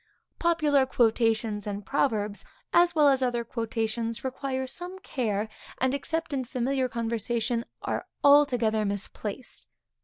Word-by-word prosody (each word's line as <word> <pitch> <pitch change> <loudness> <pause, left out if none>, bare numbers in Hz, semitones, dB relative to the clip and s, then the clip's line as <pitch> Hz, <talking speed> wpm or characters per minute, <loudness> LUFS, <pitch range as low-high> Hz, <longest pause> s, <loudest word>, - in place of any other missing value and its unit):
Popular 300 -5 +3
quotations 225 -3 +1
and 205 -1 -4
proverbs, 215 -6 0 0.3
as 345 0 +5
well 300 -2 +6
as 270 -2 +4
other 245 -2 0
quotations, 230 0 -2
require 265 0 -2
some 355 +8 -4
care; 220 - -2 0.3
and, 260 0 +1
except 325 +3 -2
in 265 -2 0
familiar 255 +1 -1
conversation, 235 0 -1 0.2
are - - -2 0.2
altogether 245 -7 +5
misplaced. 205 +3 -4
245 Hz, 120 wpm, -27 LUFS, 225-275 Hz, 0.3 s, well